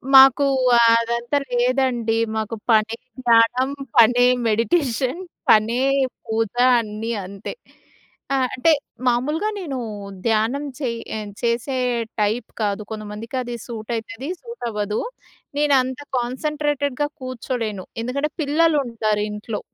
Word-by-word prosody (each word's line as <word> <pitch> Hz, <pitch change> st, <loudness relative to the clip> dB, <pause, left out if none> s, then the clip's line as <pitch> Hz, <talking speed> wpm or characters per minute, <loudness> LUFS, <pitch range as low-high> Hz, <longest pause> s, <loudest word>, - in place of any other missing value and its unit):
మాకు 270 Hz, +1 st, +8 dB, 0.3 s
అ-అదంతా 235 Hz, +3 st, +3 dB, 0.2 s
లేదండి. 245 Hz, -3 st, +1 dB, 0.2 s
మాకు 220 Hz, +1 st, -2 dB, 0.2 s
పనే 220 Hz, +1 st, +3 dB, 0.3 s
ధ్యానం, 235 Hz, +3 st, +4 dB, 0.3 s
పనే 245 Hz, +1 st, +6 dB, 0.2 s
మెడిటేషన్. 255 Hz, -, +1 dB, 0.3 s
పనే 225 Hz, +4 st, +4 dB, 0.4 s
పూజ 225 Hz, -1 st, -1 dB, 0.3 s
అన్నీ 220 Hz, +1 st, -4 dB
అంతే. 195 Hz, +1 st, -7 dB, 0.8 s
ఆహ్, 260 Hz, -1 st, +2 dB
అంటే, 300 Hz, +6 st, +3 dB, 0.4 s
మామూలుగా 295 Hz, -, +1 dB
నేను 290 Hz, -8 st, -4 dB, 0.5 s
ధ్యానం 225 Hz, +6 st, +1 dB, 0.2 s
చెయ్ 235 Hz, -4 st, -2 dB, 0.2 s
ఆహ్, 210 Hz, -1 st, -6 dB
చేసే 235 Hz, +3 st, 0 dB, 0.4 s
టైప్ 215 Hz, +3 st, 0 dB
కాదు. 205 Hz, 0 st, 0 dB
కొంతమందికి 215 Hz, +2 st, -6 dB
అది 240 Hz, -1 st, -5 dB
సూటయితది, 230 Hz, +4 st, -5 dB
సూటవ్వదు. 225 Hz, -, -3 dB, 0.6 s
నేను 295 Hz, -1 st, +3 dB
అంత 255 Hz, +1 st, -4 dB, 0.2 s
కాన్స‌న్‌ట్రేటెడ్‌గా 290 Hz, +2 st, -1 dB
కూర్చోలేను. 235 Hz, -6 st, -4 dB, 0.2 s
ఎందుకంటే 280 Hz, +5 st, -1 dB
పిల్లలుంటారు 280 Hz, -9 st, +1 dB
ఇంట్లో. 210 Hz, +1 st, -5 dB
235 Hz, 100 wpm, -22 LUFS, 220-270 Hz, 0.8 s, మాకు